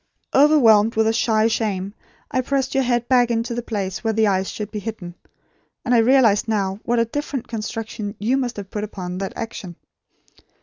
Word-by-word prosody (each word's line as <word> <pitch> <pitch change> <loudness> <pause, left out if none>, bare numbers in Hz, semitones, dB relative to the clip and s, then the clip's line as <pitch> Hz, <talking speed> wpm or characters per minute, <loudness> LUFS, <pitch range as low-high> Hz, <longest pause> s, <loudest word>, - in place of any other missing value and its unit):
Overwhelmed 235 -7 +5
with 220 0 +3
a 225 - +2
shy 220 -1 +2
shame 205 -4 -2 0.4
I 255 - +1
pressed 265 0 -1
your 270 -1 +2
head 240 -1 0
back 250 -2 +4
to 230 0 -1
the 240 - -2
place 200 -5 -4
where 225 -1 0
the 220 0 +3
eyes 190 -2 0
would 210 -1 -5
be 210 - -4
hidden; 200 -5 -7 0.7
and 250 - +1
I 240 - +5
realise 230 -3 +4
now 200 -3 -1
what 240 +1 0
a 230 - +3
different 275 +1 -4
construction 220 -2 -5
you 230 +6 0
must 250 -4 -2
have 200 -1 -8
put 210 - -3
upon 185 -3 -6
that 195 - -4
action. 215 -6 -6
225 Hz, 190 wpm, -21 LUFS, 205-240 Hz, 0.7 s, Overwhelmed